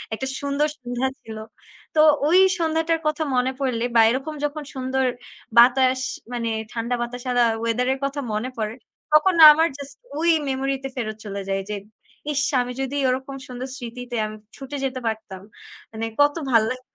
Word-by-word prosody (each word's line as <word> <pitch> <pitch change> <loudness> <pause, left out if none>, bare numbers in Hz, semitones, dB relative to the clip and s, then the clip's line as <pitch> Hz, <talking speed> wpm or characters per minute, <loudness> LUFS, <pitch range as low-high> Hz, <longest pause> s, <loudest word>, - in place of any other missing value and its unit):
একটা 265 - -4
সুন্দর 285 +1 0
সন্ধ্যা 245 +1 -2
ছিল। 220 -1 -9 0.6
তো 305 - +6 0.3
ওই 355 +4 +5 0.2
সন্ধ্যাটার 325 0 +1
কথা 305 +1 0
মনে 250 +1 +2
পড়লে 245 -4 -1
বা 225 - +7
এরকম 270 +5 -3
যখন 300 +1 -4
সুন্দর 260 0 -1 0.5
বাতাস 260 +1 +5 0.3
মানে 235 -1 -2 0.2
ঠান্ডা 235 +1 -1
বাতাস 245 +1 -5
আলা 245 -1 +4 0.2
ওয়েদার 230 +2 0
এর 270 - -6
কথা 280 +1 -3
মনে 215 +4 -2
পড়ে, 215 0 -3 0.4
তখন 325 +5 +5 0.2
আমার 320 +2 +3
জাস্ট 280 -1 -9 0.2
ওই 335 +1 +2 0.2
মেমোরি 270 +1 -1
তে 270 - -3
ফেরত 215 -3 -4
চলে 200 -1 -4
যাই। 195 0 0
যে 210 - -2 0.6
ইস! 285 - +1 0.2
আমি 245 0 -4
যদি 270 +1 -3
ওরকম 265 +2 -3
সুন্দর 250 +1 -6
স্মৃতিতে 245 0 -7
আমি 215 - -8 0.2
ছুটে 280 +1 -6
যেতে 260 -1 -3
পারতাম। 215 -4 -5 0.5
মানে 225 0 -4 0.2
কত 290 0 +4 0.2
ভাল 230 - +6
লাগতো। 255 0 -8
255 Hz, 170 wpm, -23 LUFS, 235-280 Hz, 0.6 s, বা